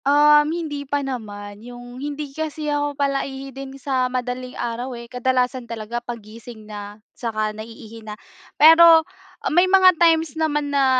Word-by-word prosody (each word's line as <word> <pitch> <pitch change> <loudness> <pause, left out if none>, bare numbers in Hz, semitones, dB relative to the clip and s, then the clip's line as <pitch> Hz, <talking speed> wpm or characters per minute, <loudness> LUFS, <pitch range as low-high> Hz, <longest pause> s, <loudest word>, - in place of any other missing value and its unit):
Um, 295 +1 +5
hindi 315 -3 -4
pa 285 0 -2
naman, 205 -5 -7
yung, 245 +1 -11
hindi 290 -1 -5
kasi 315 0 -4
ako 290 -1 -2
palaihi 275 -1 -2
din 270 +1 -8
sa 260 -2 -1
madaling 250 0 -4
araw 240 +2 -4
eh, 235 - -9
kadalasan 250 0 -1
talaga 230 +1 -5
paggising 230 -1 -10
na, 205 -1 -9 0.2
saka 215 -2 -3
naiihi 225 +1 -10
na. 215 -1 -9 0.4
Pero 325 +1 +8 0.5
may 355 +3 +4
mga 375 -1 +6
times 325 -2 +3
naman 295 -2 -1
na 280 -1 +3
260 Hz, 145 wpm, -21 LUFS, 235-295 Hz, 0.5 s, Pero